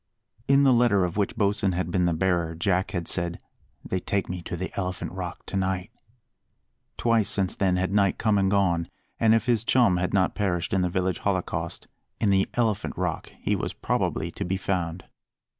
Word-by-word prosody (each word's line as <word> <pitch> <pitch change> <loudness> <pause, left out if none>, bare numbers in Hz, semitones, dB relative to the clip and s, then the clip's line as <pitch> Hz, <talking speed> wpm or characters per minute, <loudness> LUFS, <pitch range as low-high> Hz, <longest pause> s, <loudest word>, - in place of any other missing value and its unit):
In 140 +1 +5
the 135 -2 +6
letter 115 -6 +4
of 90 - -4
which 100 +1 0
Bosin 100 -3 +1
had 90 0 -2
been 90 0 +2
the - - +2
bearer 85 -1 0
Jack 90 +2 0
had 90 -4 -4
said 85 -1 -1 0.5
"They 95 - -1
take 100 +1 -2
me 90 0 -4
to 85 - -5
the 95 +2 -5
Elephant 90 -3 -3
Rock 90 -2 -6
to - - -5
night." 95 +1 -1 1.1
Twice 115 -3 +2
since 95 -2 +1
then 95 -2 +1
had 95 +1 -1
night 100 -2 +3
come 110 -3 +2
and 95 -1 +2
gone; 95 -4 +1 0.3
and 110 0 +5
if 115 0 +1
his 120 -3 +2
chum 115 -7 +4
had 90 0 -1
not 95 -1 +2
perished 90 -5 -1
in 95 - +2
the 90 - +1
village 90 0 -1
holocaust, 95 -3 -2 0.3
in 105 -3 +2
the 95 0 +2
Elephant 115 -4 0
Rock - - -3
he - - +1
was - - -3
probably - - -1
to - - -5
be 95 +2 -1
found. 90 -2 -2
95 Hz, 195 wpm, -26 LUFS, 90-100 Hz, 1.1 s, the